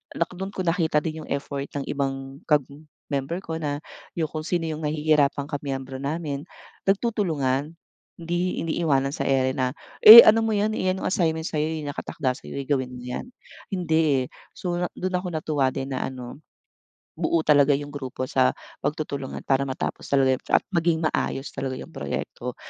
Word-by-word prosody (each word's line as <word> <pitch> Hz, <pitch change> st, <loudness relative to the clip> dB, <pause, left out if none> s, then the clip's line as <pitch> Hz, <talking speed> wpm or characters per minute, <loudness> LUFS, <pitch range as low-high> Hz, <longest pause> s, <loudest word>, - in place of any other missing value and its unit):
dun 185 Hz, +4 st, -3 dB
ko 185 Hz, -, -2 dB
nakita 165 Hz, -3 st, +1 dB
din 160 Hz, -1 st, -5 dB
yung -, -, -16 dB
effort 140 Hz, 0 st, -3 dB
ng 140 Hz, -, -2 dB
ibang 135 Hz, -1 st, -3 dB
kag 150 Hz, -3 st, +4 dB, 0.5 s
member 145 Hz, +7 st, -2 dB
ko 160 Hz, 0 st, -4 dB
na 145 Hz, -1 st, -3 dB, 0.3 s
yung 160 Hz, -3 st, -2 dB
kung 155 Hz, 0 st, -5 dB
sino 175 Hz, -1 st, 0 dB
yung 155 Hz, -, -5 dB
nahihirapang 150 Hz, -2 st, +1 dB
ka 145 Hz, -, -2 dB
miyembro 135 Hz, -2 st, -5 dB
namin 145 Hz, +1 st, -3 dB, 0.4 s
nagtutulungan. 165 Hz, -, 0 dB, 0.4 s
Hindi 175 Hz, +2 st, -1 dB
iniiwanan 150 Hz, -4 st, 0 dB
sa -, -, -2 dB
ere 130 Hz, 0 st, +1 dB
na 130 Hz, -2 st, 0 dB, 0.3 s
eh 220 Hz, +2 st, +14 dB
ano 225 Hz, +1 st, +6 dB
mo 225 Hz, -, 0 dB
yan 215 Hz, +1 st, +1 dB
yan 185 Hz, -2 st, 0 dB
yung -, -, -2 dB
assignment 160 Hz, -3 st, 0 dB
sa'yo 155 Hz, +1 st, -1 dB
nakatakda 140 Hz, -2 st, -2 dB
sa'yo 140 Hz, -, -7 dB
gawin 130 Hz, -3 st, -1 dB
yan. 125 Hz, -, -5 dB, 0.4 s
Hindi 160 Hz, -7 st, +2 dB
eh -, -, -5 dB, 0.3 s
so 175 Hz, -1 st, -3 dB, 0.2 s
dun 185 Hz, 0 st, -2 dB
ako 180 Hz, -1 st, -5 dB
natuwa 145 Hz, -4 st, +1 dB
din 135 Hz, +1 st, -4 dB
na -, -, -2 dB
ano, 130 Hz, +3 st, -7 dB, 0.8 s
buo 170 Hz, -, +2 dB
talaga 145 Hz, -1 st, +5 dB
yung 145 Hz, 0 st, -7 dB
grupo 130 Hz, -2 st, -4 dB
sa 65 Hz, -, +3 dB, 0.3 s
pagtutulungan 145 Hz, -3 st, -3 dB
para 135 Hz, 0 st, +2 dB
matapos 130 Hz, -1 st, -4 dB
talaga 135 Hz, -2 st, +4 dB, 0.2 s
at -, -, +5 dB
maging 165 Hz, -1 st, +2 dB
maayos 135 Hz, -2 st, -2 dB
talaga 130 Hz, -1 st, -3 dB
yung -, -, -9 dB
proyekto -, -, -5 dB
150 Hz, 165 wpm, -25 LUFS, 135-170 Hz, 0.8 s, eh